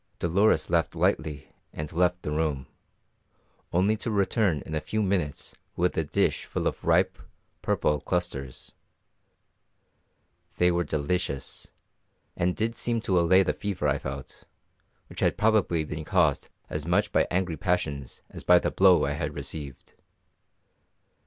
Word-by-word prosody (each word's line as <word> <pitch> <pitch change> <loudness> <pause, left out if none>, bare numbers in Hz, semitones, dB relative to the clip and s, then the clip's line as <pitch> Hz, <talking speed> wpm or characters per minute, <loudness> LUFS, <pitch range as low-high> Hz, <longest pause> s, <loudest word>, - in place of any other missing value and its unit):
Dolores 100 +6 +2
laughed 85 -4 +1
lightly 75 -3 -1 0.2
and 75 +1 -6
left 90 +1 +1
the 75 - -3
room, 75 -4 -1 1.1
only 95 +5 +2
to 115 - -4
return 100 - +1
in 80 - -7
a 75 - -1
few 110 +5 -1
minutes 90 -8 -2 0.2
with 90 +1 +1
a 80 - +1
dish 75 - 0
full - - -3
of - - -2
ripe, - - +2 0.4
purple 75 -1 +1
clusters. 70 -8 -3 1.9
They 90 0 +4
were 85 0 +1
delicious, 75 -1 -3 0.7
and 90 +1 0
did 115 +2 -1
seem 120 -1 -1
to 95 -5 +2
allay 95 +3 +5
the - - 0
fever 95 -7 -2
I 70 0 +1
felt, 65 0 -8 0.6
which - - -10
had - - +1
probably 105 -7 +2
been 75 +1 -5
caused 80 -5 +1 0.2
as - - -4
much - - +2
by - - +2
angry 90 -2 -1
passions 70 -8 -2
as - - -8
by 90 - +6
the - - 0
blow 95 -2 +5
I 70 - -1
had 75 0 -3
received. 70 -1 -8
85 Hz, 145 wpm, -27 LUFS, 75-95 Hz, 1.9 s, by